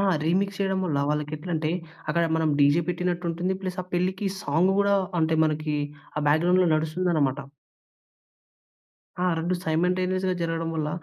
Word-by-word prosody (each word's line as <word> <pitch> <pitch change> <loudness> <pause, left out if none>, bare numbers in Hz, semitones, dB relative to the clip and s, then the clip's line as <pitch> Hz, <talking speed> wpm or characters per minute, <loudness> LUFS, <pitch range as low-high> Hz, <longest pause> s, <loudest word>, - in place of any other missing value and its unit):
ఆ! - - +2 0.2
రీమిక్స్ 195 +4 0
చేయడం 190 -1 +1
వల్ల 150 -6 0
వాళ్ళకి 150 0 -2
ఎట్లంటే 160 -1 -2 0.4
అక్కడ 170 - +2
మనం 160 -1 +1
డీజే 145 +4 +5
పెట్టినట్టుంటుంది. 175 +1 -1
ప్లస్ 185 -1 -4
ఆ - - -14
పెళ్ళికి 185 +3 0 0.2
సాంగు 165 +7 +2
గూడా 200 0 +3 0.3
అంటే 160 0 +2
మనకి 155 0 -1 0.4
ఆ - - 0
బ్యాక్‌గ్రౌండ్‌లో 175 +4 +4
నడుస్తుందనమాట. 155 -3 0 1.8
ఆ! - - +2
2 170 +3 0
సైమ‌న్‌టేనియస్‌గా 185 +3 +1
జరగడం 165 0 -1
వల్ల 155 -1 -1
170 Hz, 135 wpm, -25 LUFS, 155-185 Hz, 1.8 s, డీజే